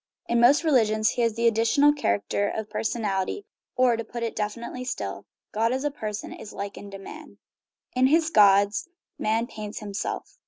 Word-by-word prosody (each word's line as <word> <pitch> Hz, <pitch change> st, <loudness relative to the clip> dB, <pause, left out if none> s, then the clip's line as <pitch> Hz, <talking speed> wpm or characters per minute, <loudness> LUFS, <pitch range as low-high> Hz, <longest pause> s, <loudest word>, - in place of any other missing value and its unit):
In 235 Hz, -, +2 dB
most 260 Hz, +7 st, +5 dB
religions 220 Hz, -8 st, +3 dB
he 245 Hz, -, -2 dB
has 230 Hz, -2 st, +1 dB
the 235 Hz, +1 st, -1 dB
additional 230 Hz, +6 st, +4 dB
character 105 Hz, -, 0 dB
of 220 Hz, -1 st, -5 dB
personality, 215 Hz, -, -2 dB, 0.3 s
or, 250 Hz, -2 st, +4 dB
to 230 Hz, -, -4 dB
put 235 Hz, +1 st, -6 dB
it 230 Hz, -, -1 dB
more -, -, -21 dB
definitely 235 Hz, +3 st, -7 dB
still, 255 Hz, -, -5 dB, 0.2 s
God 225 Hz, +2 st, +1 dB
as 260 Hz, +2 st, -1 dB
a 295 Hz, -, 0 dB
person 215 Hz, -6 st, -5 dB
is 215 Hz, -, -10 dB
likened 200 Hz, 0 st, -7 dB
to -, -, -5 dB
man. 195 Hz, -, -11 dB, 0.6 s
"In 255 Hz, +1 st, +4 dB
his 320 Hz, +3 st, +3 dB
gods 200 Hz, -, +4 dB, 0.3 s
man 225 Hz, +2 st, +1 dB
paints 215 Hz, -2 st, -8 dB
himself." 210 Hz, -, -5 dB
225 Hz, 180 wpm, -25 LUFS, 210-250 Hz, 0.6 s, most